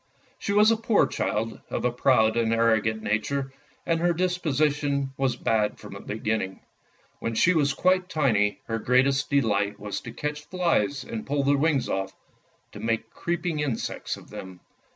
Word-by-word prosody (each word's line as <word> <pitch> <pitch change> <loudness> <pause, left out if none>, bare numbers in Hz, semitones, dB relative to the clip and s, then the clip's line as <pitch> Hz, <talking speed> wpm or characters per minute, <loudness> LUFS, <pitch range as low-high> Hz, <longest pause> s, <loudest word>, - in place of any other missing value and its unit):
She - - -2
was 210 +2 +5
a 225 - +2
poor 225 -1 +3
child, 115 +1 -2
of - - -2
a 125 - +2
proud 115 -3 +3
and 115 -1 +1
arrogant 110 -1 +2
nature, 135 +6 -1 0.3
and 165 -1 +1
her 175 +1 +2
disposition 150 -5 0
was 130 -2 0
bad 110 -3 0
from 105 - -11
the 100 - -8
beginning. 110 -2 -3 0.6
When 115 - -3
she 175 +10 +4
was 145 -4 +2
quite 185 0 +2
tiny, 105 - +1
her 115 0 -2
greatest 135 +4 +2
delight 105 -7 +1
was 105 -1 -4
to - - -8
catch 150 0 -4
flies 160 - 0
and 115 -3 -6
pull 140 0 0
their 140 +1 +3
wings 145 -2 +1
off, 95 0 -2 0.6
to - - -10
make 115 0 -2
creeping 170 -2 -2
insects 140 -6 -3
of - - -15
them. 95 -2 -9
135 Hz, 170 wpm, -26 LUFS, 110-155 Hz, 0.6 s, was